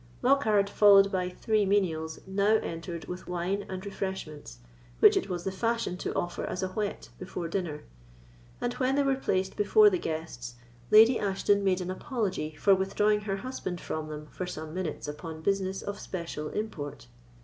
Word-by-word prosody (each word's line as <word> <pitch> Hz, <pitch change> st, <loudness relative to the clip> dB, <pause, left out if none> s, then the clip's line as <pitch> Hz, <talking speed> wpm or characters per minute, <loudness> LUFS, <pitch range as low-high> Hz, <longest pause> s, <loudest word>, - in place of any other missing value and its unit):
Lockhard, 220 Hz, -7 st, +4 dB
followed 200 Hz, -1 st, +6 dB
by 180 Hz, -2 st, 0 dB
three 215 Hz, +3 st, +1 dB
menials, 165 Hz, -6 st, 0 dB
now 200 Hz, +3 st, +2 dB
entered 165 Hz, 0 st, -5 dB
with 180 Hz, +1 st, -7 dB
wine 180 Hz, +3 st, -2 dB
and 185 Hz, +1 st, -5 dB
refreshments, 190 Hz, -, -5 dB, 0.4 s
which -, -, +7 dB
it -, -, 0 dB
was 175 Hz, -2 st, -3 dB
the 190 Hz, -, -2 dB
fashion 230 Hz, -1 st, -1 dB
to -, -, -3 dB
offer 175 Hz, 0 st, -2 dB
as 185 Hz, -, -3 dB
a 185 Hz, -, -1 dB
whet 185 Hz, -, -4 dB
before 170 Hz, -, -5 dB
dinner; 165 Hz, -4 st, -3 dB, 0.8 s
and 245 Hz, 0 st, -1 dB
when 260 Hz, +1 st, +1 dB
they 285 Hz, -, +3 dB
were 275 Hz, -1 st, +2 dB
placed 190 Hz, -8 st, -1 dB
before 415 Hz, -, +6 dB
the 365 Hz, -, 0 dB
guests, 140 Hz, -, -5 dB, 0.3 s
Lady 225 Hz, +3 st, +7 dB
Ashton 200 Hz, 0 st, +1 dB
made 185 Hz, -1 st, +2 dB
an 180 Hz, 0 st, -3 dB
apology 190 Hz, -, -3 dB
for 195 Hz, +6 st, +4 dB
withdrawing 210 Hz, +2 st, +2 dB
her 195 Hz, -2 st, -2 dB
husband 190 Hz, -6 st, -5 dB
from 155 Hz, -1 st, -4 dB
them 150 Hz, 0 st, -7 dB
for 185 Hz, -, -5 dB
some 155 Hz, -3 st, -6 dB
minutes 175 Hz, -5 st, -4 dB
upon 160 Hz, +2 st, -7 dB
business 195 Hz, 0 st, 0 dB
of 205 Hz, 0 st, -5 dB
special 170 Hz, -4 st, -5 dB
import. 160 Hz, -, -5 dB
190 Hz, 170 wpm, -29 LUFS, 170-205 Hz, 0.8 s, which